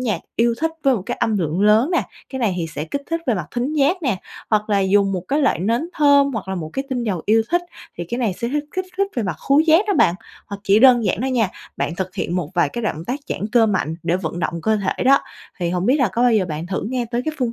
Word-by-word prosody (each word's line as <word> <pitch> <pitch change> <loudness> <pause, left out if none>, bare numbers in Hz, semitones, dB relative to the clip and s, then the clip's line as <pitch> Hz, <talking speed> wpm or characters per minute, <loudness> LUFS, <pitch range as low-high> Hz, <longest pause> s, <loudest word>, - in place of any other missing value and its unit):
nhạc 215 -9 -1 0.2
yêu 235 0 +3
thích 325 0 +1
với 270 -2 +4
một 200 - -3
cái - - -3
âm 220 -2 +1
lượng 165 +1 -1
lớn 215 - +4
nè, 350 - +2 0.3
cái 265 - -5
này 220 -7 +1
thì 165 -2 -2
sẽ 150 - -3
kích 280 - -4
thích 330 0 0
về 240 - +2
mặt 175 -5 -4
thính 250 +5 -2
giác 310 +5 +2
nè, 245 -9 +1 0.3
hoặc 215 -1 +1
là 200 - +3
dùng 195 +1 +3
một 180 -2 -2
cái 285 - +1
loại 270 - +2
nến 230 - 0
thơm, 285 -2 +4
hoặc 205 -5 -5
là 190 - -2
một 160 -3 -5
cái 270 - -3
tinh 250 -3 -2
dầu 185 -7 -2
yêu 220 +1 +4
thích, 350 +1 +2 0.4
thì 175 - -3
cái 240 - -3
này 225 -6 0
sẽ 235 +6 -4
hích 295 +2 -2
kích 370 0 -1
thích 395 0 +2
về 235 - +1
mặt 180 -6 -3
khướu 280 +2 +6
giác 325 +5 +4
đó 405 - +2
bạn. 170 - +4 0.3
Hoặc 200 -1 -7
chỉ 200 +2 +5
đơn 245 -2 +6
giản 190 +2 0
đó 260 - -1
nha, 240 -7 +1 0.3
bạn 160 - -2
thực 185 +1 -4
hiện 175 - -2
một 170 -4 -3
vài 175 - +3
cái 240 - -5
động 160 -5 -3
tác 265 +7 -3
giãn 205 - -2
cơ 230 -2 +5
mạnh 185 -6 -1
để 175 - +1
vận 170 -2 -4
động 170 0 -2
cơ 220 0 +2
thể 200 +4 -2
đó, 275 +1 +6 0.4
thì 170 -1 -1
hổng 180 +1 -1
biết 265 +4 +4
là 255 -7 +2
có 235 - 0
bao 245 - +4
giờ 210 -4 +3
bạn 155 +2 -4
thử 190 - -3
nghe 250 -1 -1
tới 240 +1 -1
cái 310 -1 -2
phương 245 -3 0
225 Hz, 295 wpm, -20 LUFS, 185-265 Hz, 0.4 s, khướu